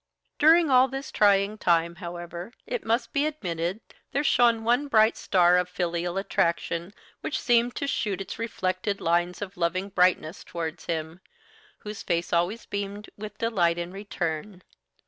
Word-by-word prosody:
During 320 0 +6
all 255 0 +6
this 270 +1 -6
trying 205 +1 +3
time, 170 0 +2
however, 175 +2 -7
it - - -3
must 230 +3 0
be 285 +2 +2
admitted 180 - -3 0.3
there 285 - +1
shone 235 -5 +3
one 245 +5 +2
bright 220 -4 +4
star 180 -1 +4
of 180 0 -2
filial 175 0 -2
attraction 170 -2 -1 0.3
which 310 - -3
seemed 240 0 +2
to 280 - -2
shoot 210 -8 -1
its 195 - -6
reflected 195 -3 -2
lines 175 +3 0
of 190 -2 -9
loving 185 +3 -1
brightness 180 -3 +1
towards 165 -1 -5
him, 160 +1 -3 0.6
whose 210 0 -8
face 170 0 -1
always 175 +7 0
beamed 200 +1 -5
with 210 0 -8
delight 180 -7 +1
in 175 0 -4
return. 185 -2 -4
195 Hz, 150 wpm, -26 LUFS, 175-230 Hz, 0.6 s, During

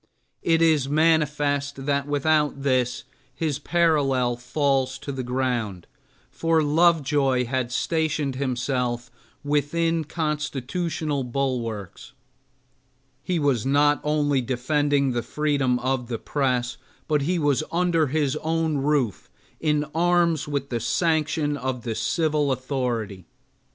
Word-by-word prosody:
It 165 0 +3
is 155 -5 +3
manifest 145 -3 +1
that 140 0 0
without 145 -1 +1
this 130 -2 +1 0.3
his 150 -2 -2
parallel 145 -7 +2
falls 130 +1 0
to 140 - -6
the 135 -1 -4
ground, 125 -7 -2 0.5
for 165 -1 +1
Lovejoy 145 -5 +3
had 125 0 -2
stationed 155 -1 0
himself 125 -2 -2 0.3
within 160 +3 0
constitutional 150 -1 -2
bulwarks. 120 -6 -3 1.1
He 180 +4 -1
was 140 -8 +1
not 145 +2 +3
only 145 -2 +1
defending 140 +3 +1
the 120 -1 -1
freedom 140 0 0
of 125 0 -1
the 115 -1 -3
press, 125 -2 -1 0.3
but 150 -2 +2
he 175 +6 0
was 145 -2 +1
under 170 -2 +2
his 145 -1 0
own 160 -1 0
roof 135 - 0 0.3
in 150 -1 +1
arms 170 -2 +2
with 140 -2 -3
the 120 - -1
sanction 155 +3 0
of 130 -3 -3
the 115 - -2
civil 150 +2 0
authority. 120 - -3
140 Hz, 115 wpm, -24 LUFS, 130-155 Hz, 1.1 s, It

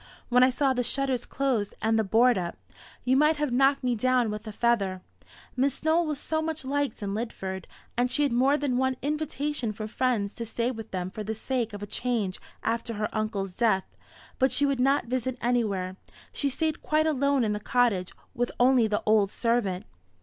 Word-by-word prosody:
When 250 0 +5
I 255 - +7
saw 265 +1 +1
the 245 -1 0
shutters 260 0 -1
closed 250 -7 -1
and 225 +1 +2
the - - +3
board 235 +5 +4
up, 175 -3 -3 0.5
you 255 +1 +3
might 300 +3 +4
have 295 -3 -1
knocked 270 +2 +3
me 250 -1 +2
down 245 0 +2
with 210 +1 -6
a - - -4
feather. 205 -5 0 0.5
Miss 270 +2 0
Nowell 320 +1 +3
was 300 -2 -2
so 315 +1 -1
much 315 -3 -3
liked 280 -5 -1
in 200 -1 -2
Lidford, 190 -4 -4 0.3
and 245 +1 +1
she 275 +4 +2
had 285 - +1
more 265 +4 +4
than 280 -4 0
one 260 0 +1
invitation 295 -4 -2
from 215 +1 -6
friends 230 -4 0
to 235 - -5
stay 235 +2 -1
with 225 -3 -8
them 185 0 -4
for 215 - -5
the 220 +2 -3
sake 240 0 -2
of 205 0 -7
a - - -2
change 220 -4 -2 0.2
after 230 0 -1
her 210 0 -1
uncle's 210 -3 -2
death; 195 -3 +2 0.6
but 265 +1 +3
she 285 - +4
would 275 -2 0
not 275 +3 +3
visit 255 +1 -2
anywhere. 200 -6 0 0.4
She 285 - 0
stayed 315 +3 -1
quite 310 0 +2
alone 280 -3 +2
in 210 -2 +1
the 210 - -2
cottage, 210 -5 +1 0.2
with 245 0 -1
only 245 -2 +5
the 210 -1 -1
old 215 -2 +4
servant." 225 -5 0
245 Hz, 200 wpm, -27 LUFS, 215-270 Hz, 0.6 s, I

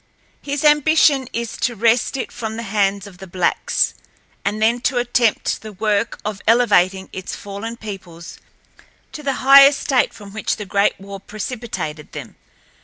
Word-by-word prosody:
His 285 0 -3
ambition 295 -2 +4
is 235 -1 -4
to 240 0 -1
wrest 230 +5 +2
it 260 - -4
from 220 -1 -5
the 230 - -4
hands 200 -2 0
of 190 -3 -13
the 190 - -10
blacks, 180 0 0 0.5
and 205 +2 -2
then 230 +3 +2
to 260 - 0
attempt 240 -2 +1
the 215 -1 -9
work 210 +2 -1
of 210 -1 -4
elevating 195 -5 +3
its 185 -1 -6
fallen 205 +3 -7
peoples 190 -6 -9 0.7
to 300 - -8
the 280 -2 -1
high 275 0 +10
estate 275 -2 +1
from 200 -2 -13
which 220 - -2
the 210 - -7
Great 200 0 +1
War 195 0 -9
precipitated 210 - -6
them. - - -8
220 Hz, 160 wpm, -20 LUFS, 195-245 Hz, 0.7 s, high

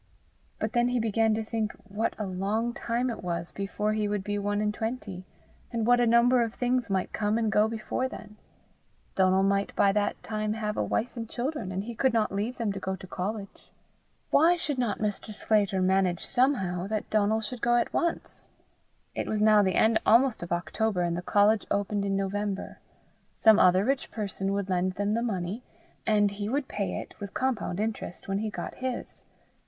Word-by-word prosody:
But 220 0 -3
then 240 0 +3
he 245 0 +1
began 225 0 +2
to 220 - -2
think 220 -1 -2
what 210 +2 -2
a 215 - -3
long 200 +5 -1
time 240 +2 -1
it 225 - -7
was 170 -1 -3
before 210 +2 -2
he 215 -1 0
would 205 -1 -1
be 205 +1 -2
one 205 0 -1
and 210 0 0
twenty, 215 -5 -4 0.5
and 230 -2 -1
what 245 +1 +5
a 240 - +3
number 240 +2 +5
of 230 0 -2
things 245 -1 0
might 190 -2 -1
come 210 0 0
and 225 -2 +1
go 210 +1 +4
before 225 +3 -2
then: 210 -3 -10 0.8
Donal 190 0 +3
might 200 0 +1
by 200 - +4
that 205 0 -1
time 215 -1 -2
have 210 -1 -3
a - - 0
wife 235 +4 -1
and 230 -2 -5
children, 245 -6 -3
and 190 +1 -2
he 235 +2 -6
could 255 +2 +1
not 220 -2 +2
leave 210 +5 -2
them 220 -4 -1
to 195 - -5
go 190 0 -3
to 190 - -11
college! 195 +3 -6 0.6
Why 335 +4 +5
should 300 -6 -3
not 235 -4 0
Mr. 210 0 -3
Sclater 200 -3 +1
manage 185 -2 +2
somehow 195 -9 +1
that 215 0 -3
Donal 215 +1 +2
should 225 +2 -5
go 240 0 +3
at 240 - +1
once? 340 -1 -2 0.7
It - - -3
was 215 - -1
now 215 0 +6
the 190 -2 +1
end 220 0 +4
almost 240 +2 +4
of 170 - -7
October, 180 +2 0
and 170 -1 0
the 175 - -3
college 205 +3 +3
opened 200 0 0
in 195 0 0
November. 195 0 -3 0.6
Some 220 -1 +6
other 185 +2 +5
rich 275 +1 0
person 195 -2 -3
would 200 -1 -1
lend 185 0 0
them 205 +2 -1
the 230 - +1
money, 200 -1 -2 0.5
and 205 -2 +3
he 205 +1 -4
would 275 +2 -1
pay 200 -2 -3
it, - - -9
with 200 -1 -7
compound 240 -8 -1
interest, 215 -4 -4
when 195 0 -1
he 220 0 -2
got 175 -4 -5
his. 255 -1 -5
210 Hz, 200 wpm, -28 LUFS, 195-230 Hz, 0.8 s, now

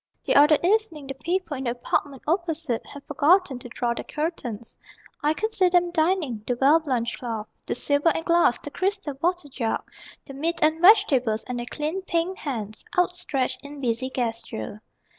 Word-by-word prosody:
The - - +2
other 295 +2 +7
evening 365 -6 +1
the 270 - -5
people 340 +3 -2
in 265 - -5
the - - +1
apartment 255 +3 -2
opposite 325 - -1
Had 285 -1 -10
forgotten 295 -1 +3
to 245 - -9
draw 240 0 -1
their - - -5
curtains. 255 -8 -4 0.5
I 300 +1 +2
could 435 +4 -2
see 370 -3 +4
them 350 -1 +3
dining: 315 - 0
the 245 - 0
well 290 +4 +6
blanched 250 -7 -2
cloth, 225 -3 -4 0.2
The - - -1
silver 285 +3 +2
and 325 0 -1
glass, 340 -7 +4
the 290 - -9
crystal 390 -4 -2
water 355 -2 0
jug, 250 -5 -2 0.4
The 275 - -10
meat 325 +5 -1
and 315 +1 +2
vegetables; 275 - +5
and 250 -1 -4
their 240 - -5
clean 315 +5 -2
pink 365 +1 -1
hands 220 -7 -5
Outstretched 355 -8 0
in 285 0 -10
busy 255 0 -1
gesture. 225 - -4
295 Hz, 180 wpm, -25 LUFS, 250-345 Hz, 0.5 s, other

